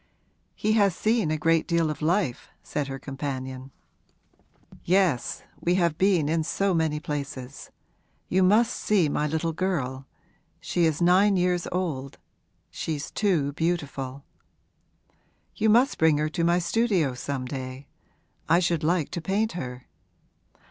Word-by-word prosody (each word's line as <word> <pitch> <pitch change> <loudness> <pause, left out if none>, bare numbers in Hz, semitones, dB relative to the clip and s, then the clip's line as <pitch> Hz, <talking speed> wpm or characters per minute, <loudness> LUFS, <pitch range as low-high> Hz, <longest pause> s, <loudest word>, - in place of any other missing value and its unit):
'He 215 - 0
has 200 -5 +3
seen 220 -5 +1
a 155 - 0
great 165 +1 +2
deal 170 -3 +1
of 155 - -7
life,' 165 -5 0
said 145 -2 -3
her 135 -1 -5
companion. 130 -1 -5 1.1
'Yes, 180 -8 +1 0.2
we 175 +1 +1
have 170 -4 +1
been 185 -6 +3
in 160 +1 +1
so 195 +4 0
many 160 -2 0
places. 140 -3 -6 0.6
You 190 - +2
must 210 +5 +4
see 190 -8 +2
my 150 +1 0
little 160 +2 -1
girl. 135 -8 -2 0.5
She 175 - 0
is 160 +1 +1
nine 190 +3 +5
years 180 -1 +1
old 155 -7 -3 0.5
she's 150 -3 -4
too 165 -9 +1
beautiful.' 140 -5 -3 1.3
'You 220 - +2
must 245 +6 +4
bring 160 -2 +4
her 150 +1 0
to 165 +2 -2
my 170 +1 +3
studio 180 - +1
some 130 +1 -4
day 130 +1 -6 0.6
I 165 - +6
should 175 -3 +1
like 165 -1 +1
to 170 - -4
paint 205 +6 0
her.' 125 -6 -6
165 Hz, 140 wpm, -26 LUFS, 140-185 Hz, 1.3 s, I